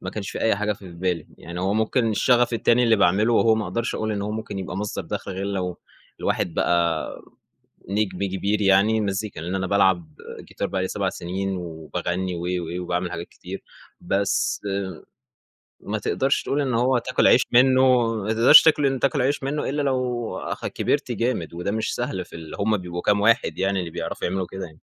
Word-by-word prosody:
ما 95 Hz, -, -5 dB
كانش 100 Hz, -2 st, -5 dB
في -, -, -6 dB
أي 110 Hz, -3 st, +2 dB
حاجة 105 Hz, +1 st, 0 dB
في 95 Hz, -3 st, -11 dB
بالي، 85 Hz, -2 st, -2 dB
يعني 85 Hz, +1 st, -7 dB
هو 95 Hz, +2 st, 0 dB
ممكن 110 Hz, +1 st, +1 dB
الشغف 120 Hz, +3 st, +3 dB
التاني 120 Hz, +2 st, +3 dB
اللي 115 Hz, -2 st, +4 dB
باعمله 100 Hz, +4 st, +3 dB
وهو 115 Hz, -1 st, +4 dB
ما 110 Hz, -1 st, -2 dB
أقدرش 115 Hz, +1 st, -2 dB
أقول 110 Hz, 0 st, -2 dB
إن 100 Hz, -1 st, -2 dB
هو 105 Hz, -, -3 dB
ممكن 110 Hz, -2 st, -5 dB
يبقى 95 Hz, -1 st, -5 dB
مصدَر 105 Hz, 0 st, -3 dB
دخل 100 Hz, 0 st, -4 dB
غير 95 Hz, +1 st, -4 dB
لو 90 Hz, -3 st, -3 dB, 0.4 s
الواحد 85 Hz, -, -1 dB
بقى 85 Hz, -2 st, +1 dB, 0.8 s
نجم 100 Hz, -2 st, -1 dB
كبير 100 Hz, +2 st, -1 dB
يعني، 100 Hz, +3 st, +4 dB
المزيكا 100 Hz, -3 st, -2 dB
لإن 85 Hz, +3 st, -4 dB
أنا 95 Hz, 0 st, -1 dB
بالعب 95 Hz, -4 st, +2 dB, 0.3 s
جيتار -, -, -5 dB
بقى 95 Hz, -, -2 dB
لي 95 Hz, -, -1 dB
7 100 Hz, -2 st, -1 dB
سنين، 95 Hz, +2 st, -3 dB
وباغنّي 90 Hz, +2 st, -4 dB
و 85 Hz, -, -5 dB
و 90 Hz, 0 st, -3 dB
وباعمل 90 Hz, 0 st, -2 dB
حاجات 85 Hz, +1 st, -6 dB
كتير 95 Hz, +2 st, -9 dB, 0.4 s
بس، 100 Hz, 0 st, 0 dB, 1.2 s
ما -, -, -3 dB
تقدَرش 135 Hz, +1 st, 0 dB
تقول 145 Hz, -, 0 dB
إن 135 Hz, -3 st, -1 dB
هو 125 Hz, +3 st, +2 dB
هتاكل 125 Hz, +1 st, +2 dB
عيش 125 Hz, -, +6 dB
منّه، 130 Hz, -2 st, +5 dB
ما 110 Hz, +1 st, -1 dB
تقدرش 120 Hz, +7 st, +9 dB
تاكل 155 Hz, -2 st, +3 dB
ان 135 Hz, -1 st, +1 dB
تاكل 140 Hz, +1 st, +1 dB
عيش 140 Hz, +2 st, 0 dB
منّه 140 Hz, +1 st, -2 dB
إلّا 145 Hz, +2 st, -1 dB
لو 125 Hz, -4 st, -1 dB
اخ -, -, -4 dB
كبِرت 140 Hz, -3 st, -1 dB
جامد، 115 Hz, -8 st, -2 dB
وده 90 Hz, +3 st, -3 dB
مش 110 Hz, +1 st, -1 dB
سهل 120 Hz, -7 st, -3 dB
في -, -, -13 dB
ال 80 Hz, -1 st, -8 dB
هُم 105 Hz, +1 st, +2 dB
بيبقوا 90 Hz, -1 st, -5 dB
كام 100 Hz, +1 st, +2 dB
واحد 115 Hz, +3 st, +2 dB
يعني 95 Hz, 0 st, 0 dB
اللي 90 Hz, -2 st, -4 dB
بيعرفوا -, -, -3 dB
يعملوا 95 Hz, +1 st, -2 dB
كده 95 Hz, 0 st, -6 dB
يعني. 80 Hz, -2 st, -15 dB
100 Hz, 195 wpm, -23 LUFS, 90-115 Hz, 1.2 s, تقدرش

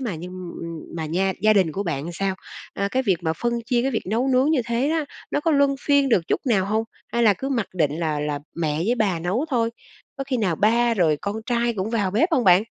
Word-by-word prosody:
mà 230 Hz, -9 st, -3 dB
nhưng, 180 Hz, +3 st, -8 dB, 0.3 s
ừm, 165 Hz, -1 st, -6 dB, 0.2 s
mà 160 Hz, -1 st, -3 dB
nha 190 Hz, +4 st, 0 dB
gia 215 Hz, -, +6 dB
đình 190 Hz, -6 st, +3 dB
của 195 Hz, -, -2 dB
bạn 165 Hz, -3 st, -3 dB
sao? 190 Hz, +2 st, -1 dB, 0.4 s
À, 200 Hz, -, -1 dB
cái 260 Hz, +3 st, +1 dB
việc 195 Hz, -7 st, +2 dB
mà 160 Hz, -2 st, 0 dB
phân 235 Hz, +8 st, -2 dB
chia 240 Hz, -1 st, +1 dB
cái 270 Hz, -, 0 dB
việc 225 Hz, -, -1 dB
nấu 235 Hz, +7 st, 0 dB
nướng 260 Hz, +3 st, +3 dB
như 310 Hz, -5 st, +3 dB
thế 235 Hz, +3 st, 0 dB
á, 320 Hz, 0 st, 0 dB, 0.3 s
nó -, -, 0 dB
có 325 Hz, -, +1 dB
luân 280 Hz, -2 st, +3 dB
phiên 285 Hz, -2 st, +3 dB
được 225 Hz, -8 st, +4 dB
chút -, -, +1 dB
nào 205 Hz, -7 st, +3 dB
hông? 220 Hz, +2 st, 0 dB, 0.3 s
Hay 235 Hz, -, +1 dB
là 215 Hz, -3 st, +5 dB
cứ 270 Hz, +8 st, -4 dB
mặc 235 Hz, -6 st, 0 dB
định 155 Hz, -3 st, 0 dB
là 155 Hz, -3 st, -1 dB
là 150 Hz, -1 st, -2 dB, 0.2 s
mẹ 155 Hz, -3 st, -1 dB
với 200 Hz, +10 st, +1 dB
bà 205 Hz, -7 st, 0 dB
nấu 185 Hz, -, -1 dB
thôi, 230 Hz, -3 st, +1 dB, 0.5 s
có 275 Hz, -, -3 dB
khi 265 Hz, -1 st, -1 dB
nào 190 Hz, -8 st, 0 dB
ba 230 Hz, +4 st, +3 dB
rồi 165 Hz, -7 st, +2 dB
con 200 Hz, +1 st, -2 dB
trai 235 Hz, -1 st, +1 dB
cũng 200 Hz, +1 st, -3 dB
vào 205 Hz, -5 st, 0 dB
bếp 300 Hz, -, +2 dB
hông 255 Hz, -6 st, +3 dB
bạn? 180 Hz, +1 st, +6 dB
215 Hz, 260 wpm, -23 LUFS, 175-245 Hz, 0.5 s, gia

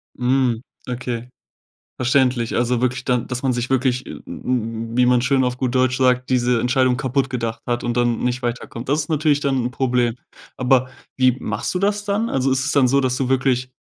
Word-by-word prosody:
Mhm, 125 Hz, -2 st, +1 dB, 0.3 s
okay, 125 Hz, -1 st, -4 dB, 0.7 s
verständlich. 125 Hz, -2 st, +1 dB
Also, 120 Hz, 0 st, +1 dB
wirklich 125 Hz, 0 st, 0 dB
dann 125 Hz, -2 st, 0 dB
dass 125 Hz, +1 st, -4 dB
man 130 Hz, -2 st, +2 dB
sich 120 Hz, +1 st, -2 dB
wirklich, 130 Hz, -1 st, +1 dB
w -, -, -8 dB
w 115 Hz, -2 st, -3 dB
wie 125 Hz, -, +5 dB
man 125 Hz, 0 st, +4 dB
schön 130 Hz, +1 st, +2 dB
auf 125 Hz, 0 st, -1 dB
gut 130 Hz, -1 st, -2 dB
Deutsch 130 Hz, 0 st, +2 dB
sagt, 125 Hz, -1 st, +2 dB
diese 125 Hz, -2 st, +2 dB
Entscheidung 125 Hz, +1 st, +2 dB
kaputt 135 Hz, 0 st, 0 dB
gedacht 115 Hz, -2 st, -3 dB
hat 120 Hz, 0 st, -2 dB
und 120 Hz, 0 st, -2 dB
dann 120 Hz, -1 st, +1 dB
nicht 125 Hz, +1 st, -1 dB
weiterkommt. 120 Hz, 0 st, -5 dB
Das 145 Hz, +2 st, +2 dB
ist 150 Hz, -, -7 dB
natürlich 155 Hz, -2 st, +2 dB
dann 140 Hz, -2 st, 0 dB
'n 125 Hz, -, -2 dB
Problem. 125 Hz, -3 st, 0 dB, 0.4 s
Aber 130 Hz, 0 st, +2 dB, 0.3 s
wie 130 Hz, -1 st, +4 dB
machst -, -, -3 dB
du 180 Hz, -, -1 dB
das 205 Hz, +1 st, 0 dB
dann? 210 Hz, +3 st, 0 dB
Also, 135 Hz, 0 st, +1 dB
ist 130 Hz, 0 st, +1 dB
es 145 Hz, -, 0 dB
dann 140 Hz, -3 st, +4 dB
so, 140 Hz, +2 st, +3 dB
dass 125 Hz, -1 st, 0 dB
du 130 Hz, -1 st, -1 dB
wirklich 130 Hz, -1 st, +1 dB
125 Hz, 210 wpm, -21 LUFS, 120-130 Hz, 0.7 s, wie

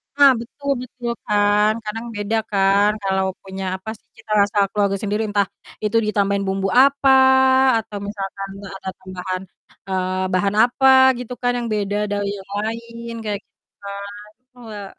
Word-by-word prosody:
Ah, 285 Hz, -1 st, +7 dB
betul 280 Hz, +4 st, -5 dB
betul 250 Hz, -1 st, -6 dB, 0.2 s
kan 210 Hz, +1 st, +3 dB
kadang 225 Hz, +2 st, -5 dB
beda 205 Hz, +2 st, -1 dB
kan 200 Hz, +1 st, +4 dB
kalau 190 Hz, 0 st, +1 dB, 0.2 s
punya, 190 Hz, 0 st, -7 dB
apa 190 Hz, +3 st, -8 dB
sih, -, -, -41 dB
cita 220 Hz, -1 st, -13 dB
rasa 205 Hz, +1 st, 0 dB
keluarga 200 Hz, -1 st, +1 dB
sendiri 210 Hz, +1 st, -1 dB
entah 200 Hz, -2 st, +1 dB, 0.4 s
itu 210 Hz, +2 st, +1 dB
ditambahin 200 Hz, -1 st, +1 dB
bumbu 195 Hz, 0 st, -1 dB, 0.2 s
apa, 275 Hz, 0 st, +3 dB, 0.7 s
atau 210 Hz, -2 st, -5 dB
misalkan, 195 Hz, -1 st, -5 dB, 0.2 s
eee, 195 Hz, -, -9 dB
ada 190 Hz, -, -6 dB
tambahan, 185 Hz, 0 st, -5 dB, 0.5 s
eee, 185 Hz, 0 st, -1 dB
bahan 200 Hz, +2 st, +1 dB
apa 250 Hz, +2 st, +2 dB, 0.3 s
gitu 250 Hz, 0 st, -6 dB
kan 245 Hz, -, +2 dB
yang 240 Hz, -, -3 dB
beda 205 Hz, -1 st, -1 dB
dari 205 Hz, 0 st, -1 dB
yang 190 Hz, 0 st, -13 dB
lain, 230 Hz, +1 st, -6 dB
kayak 205 Hz, -2 st, -3 dB
gitu -, -, -58 dB, 0.2 s
kan, 200 Hz, 0 st, -6 dB, 0.5 s
Wah. 210 Hz, -4 st, -8 dB
205 Hz, 155 wpm, -21 LUFS, 195-225 Hz, 0.7 s, Ah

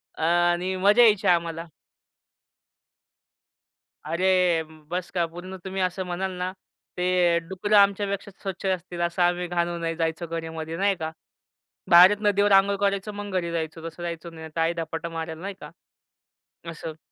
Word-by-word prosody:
अ, 160 Hz, -, -5 dB
आणि 175 Hz, +2 st, +2 dB
मजा 205 Hz, +5 st, +5 dB
यायची 210 Hz, -4 st, +4 dB
आम्हाला. 170 Hz, -1 st, +1 dB, 2.4 s
अरे, 180 Hz, 0 st, +2 dB, 0.3 s
बस 180 Hz, 0 st, -3 dB
का 175 Hz, -2 st, 0 dB
पूर्ण 175 Hz, +3 st, -9 dB
तुम्ही 190 Hz, 0 st, -4 dB
असं 185 Hz, +1 st, -1 dB
म्हणाल 185 Hz, +2 st, -2 dB
ना, 180 Hz, +1 st, -2 dB, 0.4 s
ते 180 Hz, -1 st, +2 dB
डुकरं 205 Hz, +3 st, +1 dB
आमच्यापेक्षा 200 Hz, 0 st, +2 dB
स्वच्छ 195 Hz, -1 st, -5 dB
असतील. 180 Hz, -2 st, -2 dB
असं 170 Hz, +1 st, 0 dB
आम्ही 175 Hz, 0 st, +1 dB
घाण 175 Hz, 0 st, 0 dB
होऊन 170 Hz, -1 st, -3 dB
जायचो 165 Hz, +1 st, -2 dB
घरामध्ये 160 Hz, 0 st, -5 dB
नाही 200 Hz, +1 st, +2 dB
का, 160 Hz, -1 st, -4 dB, 0.8 s
बाहेरच 180 Hz, +4 st, +8 dB
नदीवर 205 Hz, 0 st, +3 dB
आंघोळ 195 Hz, +1 st, +5 dB
करायचो, 200 Hz, +1 st, -1 dB
मग 205 Hz, 0 st, -6 dB
घरी 170 Hz, -1 st, -3 dB
जायचो. 160 Hz, 0 st, -4 dB
तसं 175 Hz, -, -11 dB
जायचो, 170 Hz, 0 st, -5 dB
नाही 160 Hz, -1 st, -9 dB
तर -, -, +1 dB
आई 165 Hz, +1 st, +2 dB
धपाटा 165 Hz, 0 st, -4 dB
मारल 160 Hz, -1 st, -5 dB
नाही 200 Hz, +1 st, -5 dB
का -, -, -9 dB, 1.0 s
असं. 160 Hz, -1 st, -8 dB
175 Hz, 150 wpm, -25 LUFS, 165-190 Hz, 2.4 s, बाहेरच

